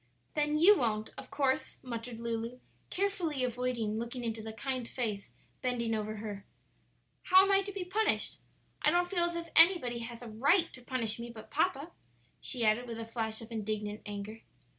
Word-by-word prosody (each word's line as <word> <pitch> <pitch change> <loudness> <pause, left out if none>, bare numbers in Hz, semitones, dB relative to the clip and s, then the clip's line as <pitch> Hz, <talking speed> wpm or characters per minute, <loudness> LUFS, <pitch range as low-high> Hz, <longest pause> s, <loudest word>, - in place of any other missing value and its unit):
"Then 300 0 +1
you 375 +7 +8
won't, 220 -3 0
of - - -9
course," 275 -2 0
muttered 235 -1 -5
Lulu, 230 +1 -3 0.3
carefully 360 -8 -1
avoiding 240 -3 -1
looking 240 +2 -4
into 225 -1 -3
the 220 0 -6
kind 255 +1 -3
face 215 -6 -3 0.3
bending 240 -3 0
over 215 0 -2
her; 205 -2 -6 0.8
"how 375 +1 +8
am 390 - +2
I 390 0 +5
to 400 +1 -5
be 385 -2 -4
punished? 425 +4 +1 0.4
I - - +5
don't 355 0 +3
feel 355 -2 +2
as 345 0 -2
if 335 -1 -5
anybody 325 -9 +6
has 235 +1 -7
a - - -7
right 290 - +3
to 255 - -10
punish 235 -3 -1
me 235 0 -5
but 220 -2 -11
papa," 315 0 0 0.5
she 240 -3 -1
added, 220 +3 +3
with 230 -1 -5
a 225 - -4
flash 225 -1 -3
of 225 - -12
indignant 210 -1 -3
anger. 205 +2 -6
240 Hz, 185 wpm, -32 LUFS, 225-305 Hz, 0.8 s, you